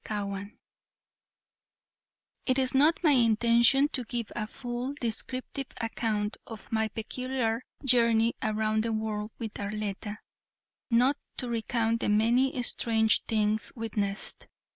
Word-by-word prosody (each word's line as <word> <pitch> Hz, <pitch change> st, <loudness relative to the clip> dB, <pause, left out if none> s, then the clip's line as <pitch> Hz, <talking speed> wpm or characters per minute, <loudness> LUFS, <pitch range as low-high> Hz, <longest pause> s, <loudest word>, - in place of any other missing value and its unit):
CHAPTER 200 Hz, -2 st, -3 dB
IX 200 Hz, +1 st, -8 dB, 2.0 s
It 255 Hz, -1 st, +2 dB
is 260 Hz, -1 st, +1 dB
not 305 Hz, +6 st, +4 dB
my 310 Hz, -, +5 dB
intention 235 Hz, +2 st, +5 dB
to 255 Hz, -, -3 dB
give 235 Hz, -1 st, -4 dB
a 215 Hz, -2 st, -2 dB
full 245 Hz, +2 st, -5 dB
descriptive 255 Hz, +3 st, -2 dB
account 220 Hz, -2 st, -2 dB
of 225 Hz, -2 st, -10 dB
my 220 Hz, -1 st, +1 dB
peculiar 235 Hz, +1 st, -2 dB, 0.2 s
journey 235 Hz, -2 st, +4 dB
around 215 Hz, 0 st, +1 dB
the 230 Hz, -1 st, -1 dB
world 215 Hz, -1 st, -2 dB
with 225 Hz, -3 st, -5 dB
Arletta, 205 Hz, 0 st, -4 dB, 0.7 s
nor 245 Hz, +3 st, +4 dB, 0.2 s
to 250 Hz, -, -2 dB
recount 230 Hz, 0 st, 0 dB
the -, -, -1 dB
many 240 Hz, +5 st, +3 dB
strange 220 Hz, -2 st, +3 dB
things 215 Hz, -1 st, 0 dB
witnessed. 210 Hz, -3 st, -3 dB
225 Hz, 120 wpm, -29 LUFS, 215-250 Hz, 2.0 s, my